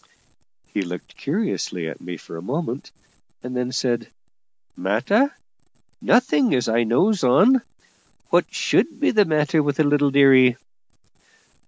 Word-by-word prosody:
He 105 - -4
looked 90 -1 -8
curiously 140 - -3
at - - -8
me 90 -1 -7
for - - -12
a 80 - -7
moment, 135 - -5 0.5
and 125 +1 -6
then 125 0 -2
said: 120 -2 -2 0.6
"Matter? 200 - +1 0.7
Nothing, 150 - +2
as 125 - -1
I 115 +1 +1
knows 185 - +1
on. 215 - +4 0.7
What - - +2
should - - 0
be - - +2
the 210 -2 +3
matter 155 0 +1
with 145 -1 -1
the 155 - +3
little 145 -1 +2
dearie?" 135 -3 +5
135 Hz, 135 wpm, -21 LUFS, 120-160 Hz, 0.7 s, dearie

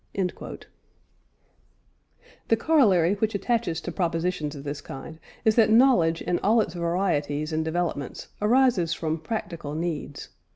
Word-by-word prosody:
" - - -41 2.4
The 225 - +3
corollary 210 - +4
which 220 +1 -1
attaches 200 -5 0
to 175 - -5
propositions 165 -3 -1
of 140 - -8
this 145 0 -5
kind 155 +4 -9 0.3
is 220 - +5
that 225 -2 +5
knowledge 220 -9 +4
in 175 - 0
all 220 +4 +3
its 200 -6 0
varieties 170 -4 -1
and 160 0 0
developments 160 -4 -3
arises 220 -6 +3
from 160 0 -2
practical 165 -5 -5
needs. 160 -3 -4
175 Hz, 130 wpm, -25 LUFS, 160-215 Hz, 2.4 s, is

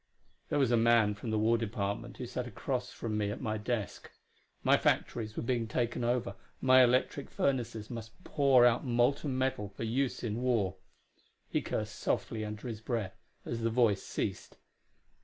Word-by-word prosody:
There - - +1
was 135 -4 +3
a 120 - +4
man 115 -2 +4
from 105 +3 -6
the 110 - +1
War 115 +2 +3
Department 110 +1 -3
who 125 - -5
sat 125 0 -4
across 125 +2 -3
from 110 -2 -3
me 105 -1 0
at 105 - -4
my 110 -1 -2
desk; 110 -1 -3 0.5
my - - +5
factories 110 -2 0
were - - -2
being 115 -1 0
taken 120 +2 -1
over; 120 0 0 0.3
my 130 0 +7
electric 130 +3 +1
furnaces 120 -5 -1
must 115 +7 -8
pour 135 -4 +5
out 120 -1 +3
molten 130 +2 +1
metal 130 -6 -1
for 100 +3 -7
use 125 +4 -1
in 115 0 -2
war. 110 -7 +1 0.7
He - - +1
cursed - - -4
softly 110 -1 -1
under 105 +2 -6
his 110 -3 -5
breath 110 -5 -3 0.2
as 115 -1 -3
the 115 - +1
voice 115 -4 +3
ceased. - - -4
115 Hz, 175 wpm, -31 LUFS, 110-125 Hz, 0.7 s, my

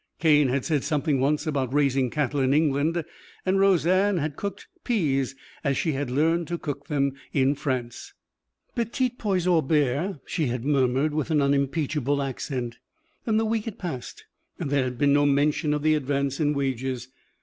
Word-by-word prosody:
Cane 150 -3 +4
had 130 +1 -1
said 150 -4 0
something 150 -2 0
once 145 +3 +1
about 140 -5 -1
raising 135 -2 +2
cattle 145 +1 -1
in 135 +1 +3
England, 155 +2 +1 0.4
and 190 +1 +2
Roseanne 190 +1 +3
had 150 -2 -2
cooked 200 +4 -5 0.2
peas 135 - 0 0.3
as 140 -2 +1
she 160 - 0
had 140 -2 -2
learned 160 +5 +1
to 170 - -2
cook 145 -3 -5
them 140 -3 +1 0.2
in 135 0 +3
France. 130 -4 -4 0.6
"Petits 240 +1 -1
pois 190 -5 0
au 175 -3 +4
beurre," 150 +4 0
she 160 -6 -1
had 120 0 -3
murmured 140 +1 +2
with 155 0 -1
an 155 -2 +3
unimpeachable 140 0 +1
accent. 125 -3 -4 0.5
Then 220 -2 +2
the 225 - +2
week 220 -1 -1
had 225 -4 -6
passed 160 -9 -6 0.3
and 140 - -4
there 140 -2 +2
had 125 -1 -4
been 140 +1 +3
no 145 0 +4
mention 145 +2 +2
of 150 0 -1
the 155 0 +4
advance 140 -2 -1
in 150 -1 +1
wages. 130 -2 -2
145 Hz, 175 wpm, -25 LUFS, 135-165 Hz, 0.6 s, Cane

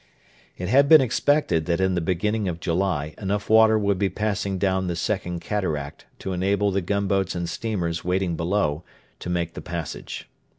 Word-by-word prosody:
It 90 - -4
had 140 +7 +4
been 160 - +10
expected 130 - +1
that 85 0 +1
in 95 0 +2
the 90 - 0
beginning 100 +5 0
of 85 -2 -3
July 85 -3 -1
enough 100 +1 -2
water 110 0 +6
would 100 -3 +1
be 100 -1 +2
passing 100 0 -2
down 95 -1 0
the 85 - -2
Second 90 -1 -2
Cataract 80 -9 -3
to 95 - -4
enable 100 +2 +1
the 100 +1 0
gunboats 95 0 0
and 85 -1 -2
steamers 85 -6 -3
waiting 90 -1 0
below 85 -3 0 0.4
to - - -6
make 85 -1 -1
the - - -7
passage. 85 -4 -6
95 Hz, 175 wpm, -24 LUFS, 85-105 Hz, 0.4 s, been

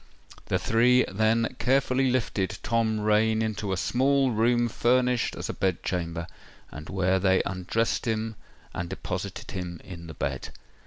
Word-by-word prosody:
The - - +1
three 125 +3 +4
then 110 +4 +1
carefully 130 0 +2
lifted 110 -6 -1
Tom 110 -1 +1
Rain 110 +1 +3
into 110 -2 -2
a 95 - 0
small 135 +6 +2
room 120 +2 +2
furnished 125 +1 +1
as - - -5
a - - -3
bed 95 -2 -1
chamber, 85 -2 -2 0.5
and 75 +1 -9
where 95 0 +1
they 95 0 +3
undressed 95 +6 -1
him 110 0 -1 0.4
and 85 0 -4
deposited - - -5
him 90 -2 -5
in 85 -3 -9
the 80 - -9
bed. 65 -2 -3
110 Hz, 150 wpm, -27 LUFS, 95-120 Hz, 0.5 s, three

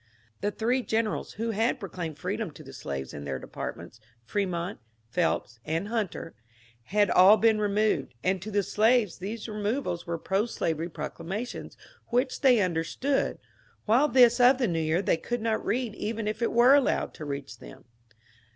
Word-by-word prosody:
The 205 - 0
three 240 +5 0
generals 220 -2 -1
who 230 +2 -2
had 225 +5 0
proclaimed 175 -6 -5
freedom - - -3
to - - -12
the - - -12
slaves 65 -1 -5
in 70 - -7
their 70 -2 -3
departments 110 - -7
— 115 0 -38
Fremont, 180 - -2 0.3
Phelps, 125 -7 -1
and 165 +8 -2
Hunter 215 -7 -3 0.3
— 115 0 -30
had' 205 -3 +4
all 195 +4 +7
been 220 -1 +3
removed, 205 - 0
and 185 0 +1
to 210 - -6
the 205 -1 +1
slaves 215 -2 +2
these 210 +5 -5
removals 210 -4 -2
were 170 0 -2
pro 195 +6 0
slavery 165 -6 -2
proclamations 170 +8 -6 0.3
which 250 +2 0
they 255 -6 +5
understood, 185 - 0 0.5
while 245 +8 +4
this 245 -3 +5
of 250 +2 +6
the 250 -3 +1
New 165 -3 0
Year 160 +4 +1
they 170 - +2
could 240 +8 -3
not 220 -1 -1
read 240 -1 -1
even 215 0 -3
if 215 +2 -3
it 230 - +1
were 240 +3 +6
allowed 285 -2 +2
tO' 155 - -8
reach 140 -1 -6
them. - - -13
205 Hz, 175 wpm, -28 LUFS, 170-230 Hz, 0.5 s, all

